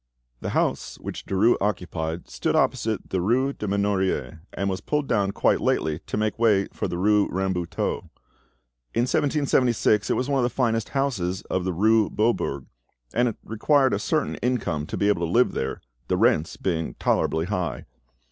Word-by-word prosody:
The - - -4
house - - -1
which - - -7
Derues 100 +5 +3
occupied 90 -4 -2
stood - - -1
opposite 110 -2 0
the 95 - 0
rue 130 +8 +1
des 105 - -5
Menoriers, 100 -4 0
and 100 - -2
was 95 -1 -2
pulled 150 -2 -1
down 100 -4 +1
quite - - +2
lately 80 0 0
to - - -3
make 110 +1 -1
way 105 -4 +4
for - - -2
the 85 - -4
rue 105 +2 +3
Rambuteau. 95 -2 -2 0.9
In - - +3
1776 125 -6 +2
it - - +2
was 130 - -1
one 140 -1 +1
of - - +2
the 120 - +2
finest 115 -3 0
houses 110 -10 -1
of 95 -1 0
the 95 - -1
rue 110 +4 +3
Beaubourg, 105 - 0 0.5
and 120 +2 +3
it 115 - -2
required 130 +5 +2
a 100 - 0
certain 155 +7 -1
income 90 -12 -1
to - - -4
be 100 - +1
able 100 -5 +2
to 85 - -1
live 125 +4 +4
there, 65 - -3 0.3
the - - +1
rents 80 - +2
being 80 -8 -2
tolerably 80 +1 +1
high. 90 -3 -3
105 Hz, 175 wpm, -25 LUFS, 90-120 Hz, 0.9 s, way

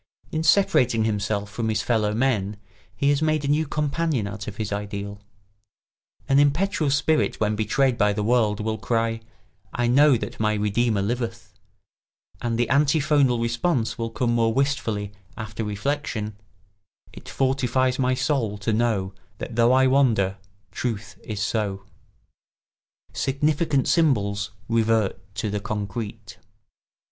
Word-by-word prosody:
In 155 - -1
separating 160 - +3
himself 105 -1 -1
from 110 0 -2
his 110 0 0
fellow 110 -3 +1
men 105 -4 0 0.4
he 140 +7 +1
has 145 +1 +2
made 155 -2 +1
a - - -1
new 150 +2 +1
companion 150 -4 -1
out 100 +1 -6
of 105 - -6
his 105 -2 -3
ideal. 100 0 -5 1.1
An 135 +1 +4
impetuous 150 +1 +2
spirit 155 +2 +1
when 105 0 +1
betrayed 120 +4 +1
by 105 -1 +4
the 105 0 -2
world 110 -2 +2
will 110 0 -2
cry, 115 0 -1 0.5
"I 120 - -1
know 135 +2 +5
that - - -7
my 110 0 +1
redeemer 105 0 +1
liveth"; 115 -2 -4 0.9
and 115 -1 -1
the 120 - +1
antiphonal 140 -2 +3
response 115 0 -1
will 115 0 -2
come 120 +1 0
more 115 -1 +2
wistfully 115 -6 -1 0.3
after 110 -1 -5
reflection: 105 0 -3 0.8
"It - - -11
fortifies 130 -1 +1
my 130 0 +2
soul 120 -7 0
to 100 +2 -1
know 105 -4 0 0.2
That 115 - -6
though 120 +1 +4
I 130 +1 +5
wander, 115 -8 +2 0.3
Truth 115 -1 -4
is 105 -1 -3
so." 105 -4 -2
[Sidenote: - - -29 1.3
Significant 145 +1 0
symbols 105 - +2 0.2
revert 110 -4 0
to 105 -1 -2
the 105 - -1
concrete. 105 +1 -5
115 Hz, 140 wpm, -24 LUFS, 105-135 Hz, 1.3 s, know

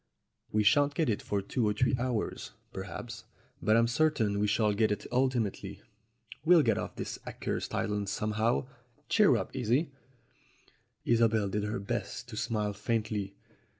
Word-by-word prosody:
"We 105 0 +2
shan't 140 +7 +4
get 155 -6 +2
it 105 - -2
for 100 -1 -2
two 110 +3 0
or 105 - +2
three 125 +4 +2
hours, 120 -3 -2 0.2
perhaps, 100 +5 -7 0.4
but 110 -2 +4
I'm 115 - +5
certain 115 -6 +1
we 105 - +2
shall 105 0 +2
get 110 +1 +2
it 105 0 -2
ultimately. 125 -5 -1 0.6
We'll 165 -1 +6
get - - +2
off - - -5
this - - -5
accursed - - -3
island 105 -1 -1
somehow. 110 +4 0 0.4
Cheer 210 -3 +5
up, - - -3
Isie!" 130 +5 +1 1.1
Isobel 115 -3 +3
did 105 +1 -1
her 105 0 -2
best 105 +3 -4
to 110 - -7
smile 105 -1 -1
faintly. 105 -2 -2
110 Hz, 150 wpm, -30 LUFS, 105-125 Hz, 1.1 s, We'll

